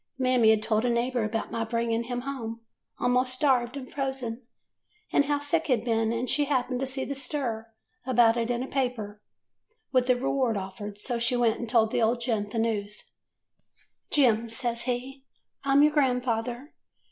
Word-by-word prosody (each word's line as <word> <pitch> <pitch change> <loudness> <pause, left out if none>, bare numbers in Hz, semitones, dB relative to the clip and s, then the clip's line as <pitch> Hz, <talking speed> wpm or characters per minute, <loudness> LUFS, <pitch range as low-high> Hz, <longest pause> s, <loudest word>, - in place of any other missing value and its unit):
Mammy 250 -4 +4
'd 215 - -5
told 220 0 +1
a 245 - +2
neighbor 240 0 0
about 220 +1 -3
my 230 - -1
bringing 230 0 0
of - - -12
him 245 0 -3
home 235 -4 -5 0.4
a'most 250 +1 +2
starved 255 -2 +1
and 260 -2 -7
frozen, 265 -4 -3 0.7
and 285 - +4
how 290 +1 +1
sick 305 +3 0
he 260 - +4
'd 230 0 -6
been, 225 -1 +1
and 235 +2 -2
she 290 +3 +1
happened 255 -3 0
to 270 - -1
see 265 0 -2
the 280 - -3
stir 260 -5 -2 0.4
about 240 -3 +4
it 235 0 -1
in 245 +1 0
a - - -5
paper, 240 -7 -3 0.7
with 255 -1 +2
a 250 - +6
reward 255 -3 0
offered, 200 +2 -6
so 235 +3 -2
she 235 +2 +2
went 235 -2 +2
and 235 - -5
told 225 -2 +3
the - - +1
old 230 +2 +2
gent 225 -4 -1
the 230 - -5
news. 210 -2 -2 0.5
" - - -36
'Jem,' 235 -5 +3
says 235 0 -2
he, 245 -1 0 0.2
T 270 - -31 0.4
'm 275 +1 +5
your 300 - +5
grandfather. 250 -1 0
245 Hz, 195 wpm, -27 LUFS, 225-260 Hz, 0.7 s, a